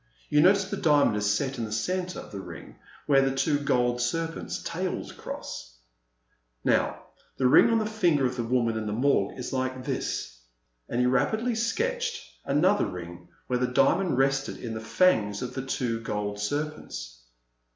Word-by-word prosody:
You 150 - +5
notice 190 +3 +5
the 200 - -2
diamond 145 - +4
is 105 0 +1
set 130 +4 -1
in 115 - -1
the 105 - -7
centre 180 +11 -2
of - - -10
the 100 - -6
ring - - -10 0.3
where 140 -2 +5
the 135 0 +1
two 145 +2 +1
gold 125 -3 +1
serpents' 165 +7 -2
tails 180 +2 -3
cross! - - -8 0.9
Now - - +1 0.3
the 130 - 0
ring 130 - +7
on 230 - +3
the 220 - 0
finger 175 -10 +2
of 125 0 -1
the 120 - -2
woman 115 -1 +1
in 110 - -4
the 105 - -2
Morgue 135 +5 +1
is 125 0 -5
like 130 -1 -2
this," - - -3 0.5
and 120 - -1
he 125 - +3
rapidly 220 - +1
sketched 470 - -1 0.2
another 180 +9 +3
ring 90 -1 -8 0.2
where 125 -1 -1
the 125 - +1
diamond 135 +5 +2
rested 135 +1 +1
in 115 -3 -6
the 110 - -4
fangs 110 - +2
of 125 0 -5
the 130 - -3
t^'o 125 -3 -2
gold 105 -2 -3
serpents. 105 - -4
130 Hz, 175 wpm, -27 LUFS, 115-170 Hz, 0.9 s, ring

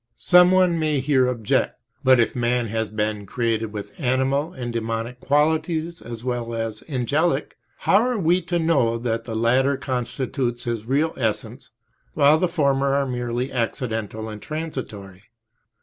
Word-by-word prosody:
Some 180 0 +6
one 185 -2 +3
may 155 -3 +1
here 130 -1 +2
object, 115 -4 0 0.2
"But 130 -2 +6
if 115 - +1
man 120 -1 0
has 110 0 -2
been 105 -1 -2
created 115 -1 -1
with 105 -1 -7
animal 135 +3 +1
and 120 -6 -5
demonic 115 +2 -3
qualities 160 +4 0
as 115 0 -8
well 120 -2 -3
as 115 -1 -4
angelic, 145 +3 0 0.2
how 195 - +3
are 250 0 0
we 180 -1 +2
to 175 0 0
know 145 -9 +2
that 115 -1 -2
the 115 - -5
latter 130 +5 +2
constitute 125 -1 -3
his 115 -2 -3
real 150 +5 +1
essence, 115 +1 -3 0.5
while 150 +1 +5
the 180 - +1
former 140 -4 +1
are 140 0 +1
merely 125 0 -3
accidental 110 -2 -3
and 105 -1 -8
transitory?" 110 - -6
125 Hz, 150 wpm, -23 LUFS, 115-150 Hz, 0.5 s, Some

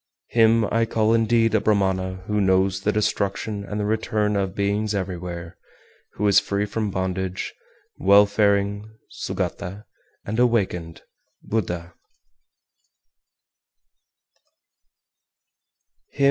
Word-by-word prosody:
419. - - -17
Him 115 -1 +4
I - - +3
call 110 0 +2
indeed 115 0 +3
a 110 - +3
Brahmana 95 -3 0
who 105 +1 0
knows 95 0 +2
the 105 - +1
destruction 100 0 -1
and 105 +1 -5
the 105 - -1
return 105 -1 0
of 95 -1 -1
beings 100 +1 0
everywhere, 90 -2 -5 0.5
who 105 - -1
is 100 -2 +6
free 100 +1 -1
from 105 +1 -2
bondage, 95 0 -3 0.5
welfaring 100 +1 +3
(Sugata), 100 +4 -4 0.4
and 110 +3 -3
awakened 95 -9 0 0.4
(Buddha). 90 -5 -3
100 Hz, 100 wpm, -23 LUFS, 95-105 Hz, 0.5 s, is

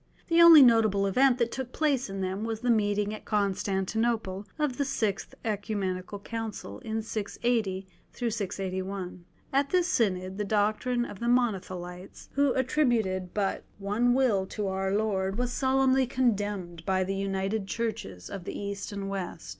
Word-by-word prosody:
The 335 0 +5
only 330 -4 +10
notable 220 -5 +4
event 255 +6 +4
that 235 -2 0
took 260 -2 -5
place 280 -7 0
in 195 0 -4
them 190 +2 -2
was 225 -1 -3
the 245 -1 +2
meeting 205 -1 +1
at 215 - -8
Constantinople 200 0 -1
of 295 -4 -1
the - - +3
Sixth 220 -8 -2
Oecumenical 205 -3 -2
Council 210 - -6
in 220 0 -3
680 215 -2 -1 0.9
1. 185 -2 -6 0.3
At 275 +1 +2
this 360 +1 +2
Synod, 190 - 0
the - - +1
doctrine 215 +4 +1
of 200 - -9
the 235 - -2
Monothelites, 185 -7 -2
who 280 -1 +2
attributed 235 -9 +1
but 200 -2 -1
one 210 +5 +1
will 220 -8 +2
to 210 +1 -4
Our 190 0 -1
Lord, 195 -2 0
was 245 0 -1
solemnly 265 -1 +3
condemned 205 -9 -1
by 185 +1 +1
the 190 +1 -2
united 195 +1 -2
Churches 215 - -4
of 190 -3 -7
the - - -5
East 200 0 -5
and 200 -1 -4
West. 185 - -5
210 Hz, 155 wpm, -28 LUFS, 190-240 Hz, 0.9 s, only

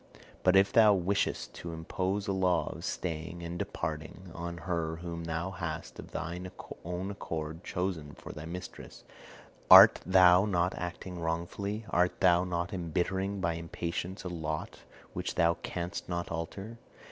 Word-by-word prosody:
But 90 0 +4
if 95 +1 +5
thou 110 -3 +7
wishest 95 +2 0
to 85 -1 -6
impose 95 +5 -2
a - - +1
law 90 -2 +1
of - - -10
staying 85 0 -4
and 85 +1 -5
departing 80 +4 -5
on 85 +1 -5
her 85 -3 -1
whom 85 0 -6
thou 85 +3 -2
hast 85 -2 -5
of - - -9
thine 85 +4 -4 0.3
own 90 +3 -3
accord 80 -4 -5
chosen 85 -6 -3
for - - -9
thy 75 - -8
mistress, 90 +2 -8 0.7
art - - +11
thou 90 0 +6
not 90 -3 +1
acting 90 0 -5
wrongfully, 85 +6 -3
art 90 +1 +2
thou 90 -2 +5
not 90 0 -2
embittering 95 +3 -1
by 85 -1 +1
impatience 85 +3 -4
a - - -4
lot 80 -3 -4 0.3
which - - -3
thou 85 0 +4
canst 90 +1 -4
not 85 -1 -3
alter? 95 +7 -5
85 Hz, 150 wpm, -31 LUFS, 85-95 Hz, 0.7 s, art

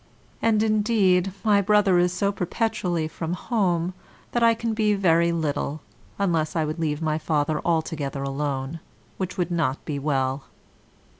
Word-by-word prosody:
And, 220 -1 +3
indeed, 205 -4 +2
my 205 -2 +4
brother 200 -2 +4
is 175 0 +3
so 200 +3 0
perpetually 185 -4 -1
from 165 +1 -4
home, 180 -4 0 0.4
that 240 - 0
I 230 0 +5
can 230 0 -2
be 215 -1 +2
very 170 -3 +3
little, 155 -2 -2 0.4
unless 165 -5 0
I 160 -2 +1
would 155 +2 -4
leave 155 -1 -1
my 155 0 0
father 150 -1 0
altogether 155 -5 -1
alone, 140 +2 -3 0.4
which 185 -1 -4
would 180 -1 -1
not 150 -6 -1
be 145 -3 -3
well. 135 -1 -1
170 Hz, 150 wpm, -24 LUFS, 155-200 Hz, 0.4 s, I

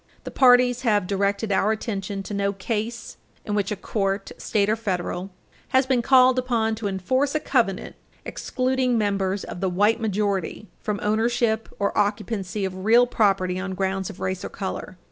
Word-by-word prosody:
The - - -7
parties 250 -1 +5
have 210 -6 +2
directed 200 +2 0
our 200 +2 +2
attention 200 -3 -3
to 205 - -7
no 200 0 0
case 220 +3 -4 0.3
in 210 - -3
which 205 -1 0
a - - 0
court, 195 -1 -2
state 205 -2 +1
or 215 - +2
federal, 185 -3 -3 0.4
has 260 0 +3
been 260 -2 +2
called 255 0 +5
upon 235 -3 0
to 215 -2 -3
enforce 255 - 0
a - - +3
covenant 235 -10 0 0.3
excluding 255 -1 0
members 200 -2 0
of 175 - -7
the 190 - +1
white 205 +6 +2
majority 205 -1 -1
from 210 -1 -3
ownership 225 +1 +1
or 200 - -1
occupancy 205 -1 -1
of 185 0 -5
real 235 +4 +6
property 195 -6 +1
on 190 0 -4
grounds 190 0 -1
of 200 - -10
race 185 -1 -3
or - - -4
color. 190 -1 -6
210 Hz, 170 wpm, -24 LUFS, 195-235 Hz, 0.4 s, real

